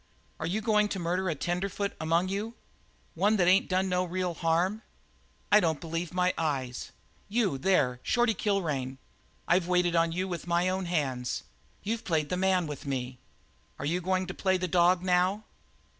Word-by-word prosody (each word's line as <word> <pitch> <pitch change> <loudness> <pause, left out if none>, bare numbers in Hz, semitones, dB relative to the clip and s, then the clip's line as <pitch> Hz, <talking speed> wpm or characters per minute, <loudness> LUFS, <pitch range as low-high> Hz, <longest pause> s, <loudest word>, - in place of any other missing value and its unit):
"Are 160 - -2
you 200 +6 -1
goin' 210 -1 +3
to 205 - -4
murder 180 +2 -1
a 160 - -1
tenderfoot 190 +6 -2
among 165 +3 +2
you? 210 +4 -3 0.6
One 205 +6 +2
that 180 -4 +2
ain't 190 +2 +4
done 185 +1 +1
no 180 0 +1
real 180 0 -2
harm? 175 +6 0 0.7
I 210 - +8
don't 160 -6 0
believe 165 0 -4
my 180 0 +1
eyes. 135 -6 -2 0.4
You, 200 - +1
there, 130 -8 +2
Shorty 240 -2 +2
Kilrain, 150 -12 -1 0.5
I've 175 0 +3
waited 180 -1 +2
on 165 0 +3
you 185 +3 -2
with 175 -2 -5
my 175 +1 +2
own 190 0 -1
hands. 135 -8 -2 0.4
You've 225 +3 -2
played 155 -4 0
the 180 - 0
man 185 -1 +2
with 145 -2 -7
me. 125 -2 -3 0.6
Are 140 - -5
you 175 +5 0
goin' 185 +1 0
to 190 - -6
play 190 0 +1
the 185 0 -2
dog 175 +1 +3
now? 185 +3 +2
180 Hz, 175 wpm, -29 LUFS, 165-190 Hz, 0.7 s, I